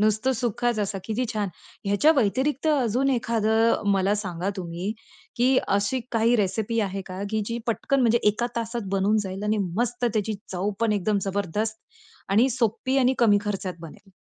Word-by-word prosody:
नुसतं 215 +5 +2
सुकाच 240 -1 -1
असा 200 -1 -1
किती 230 +3 -1
छान. 210 -2 -1 0.4
ह्याच्या 205 +10 +4
व्यतिरिक्त 260 +5 +1
अजून 265 -2 +2
एखादं 225 -2 +2
मला 195 +1 +2
सांगा 190 -2 -3
तुम्ही, 175 +2 -4 0.5
की 255 +2 +4 0.2
अशी 205 +6 0
काही 230 +1 +3
रेसिपी 215 +3 0
आहे 195 -1 -2
का 185 +1 -6
की 220 - 0
जी 230 +1 -3
पटकन 265 +4 0
म्हणजे 235 -1 +4
एका 215 +3 0
तासात 230 -2 -3
बनून 195 +2 +2
जाईल 195 +1 -6
आणि 210 +1 +1 0.2
मस्त 245 +1 -1
त्याची 220 -2 0 0.2
चवपण 205 +4 0
एकदम 205 +1 +1
जबरदस्त 205 +3 -2 0.5
आणि 230 +7 +4
सोपी 240 +2 0
आणि 260 0 +3
कमी 210 -4 +5
खर्चात 195 -3 -3
बनेल? 170 +5 -12
215 Hz, 160 wpm, -25 LUFS, 200-240 Hz, 0.5 s, कमी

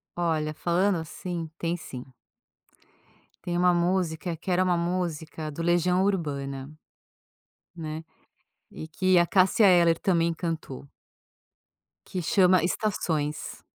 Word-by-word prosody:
Olha, 160 -3 -1
falando 180 +4 +1
assim, 165 +1 -5
tem 170 +1 -1
sim. 130 -5 -8 1.4
Tem 175 0 -2
uma 180 0 +4
música 175 -1 0
que 185 - -5
era 180 +1 +3
uma 180 -2 +2
música 170 -3 -3
do 160 +3 -5
Legião 175 +2 +2
Urbana, 140 -7 -2 1.0
né, 160 -1 -6 0.7
e 155 - -8
que 185 +2 +3
a 170 - +3
Cássia 195 +3 +4
Eller 170 -3 +5
também 170 -4 +1
cantou. 160 -5 -5 1.2
Que 185 - -4
chama 185 0 +4
Estações. 160 -6 -2
170 Hz, 115 wpm, -26 LUFS, 160-180 Hz, 1.4 s, Eller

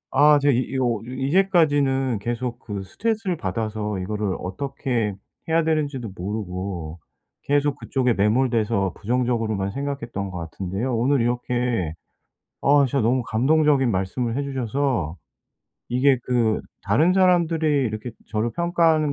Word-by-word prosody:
아 150 +2 +6
제가 140 0 +3
이 120 - +2
이거 125 -3 0
이제까지는 140 - +2
계속 120 +2 -3
그 100 -2 -6
스트레스를 200 - -2
받아서 105 0 -3
이거를 100 +1 -2
어떻게 120 +1 -2 0.3
해야 165 +1 +3
되는지도 145 -8 -1
모르고 90 -4 -4 0.4
계속 145 0 +1
그쪽에 125 -3 0
매몰돼서 110 -2 +1
부정적으로만 115 -3 0
생각했던 120 -6 -4
것 90 - -6
같은데요. 95 +9 -3
오늘 130 +4 +2
이렇게 120 -7 -1 0.7
아 145 0 +5
진짜 135 +2 0
너무 125 +3 +2
감동적인 135 +2 +3
말씀을 115 +5 -1
해 140 - 0
주셔서 130 - -1 0.7
이게 130 +2 +3
그 115 -3 +1 0.2
다른 150 - +3
사람들이 175 -4 +3 0.2
이렇게 110 +3 -4 0.2
저를 110 +2 0
평가하는 165 -3 +2
125 Hz, 315 characters per minute, -23 LUFS, 105-140 Hz, 0.7 s, 아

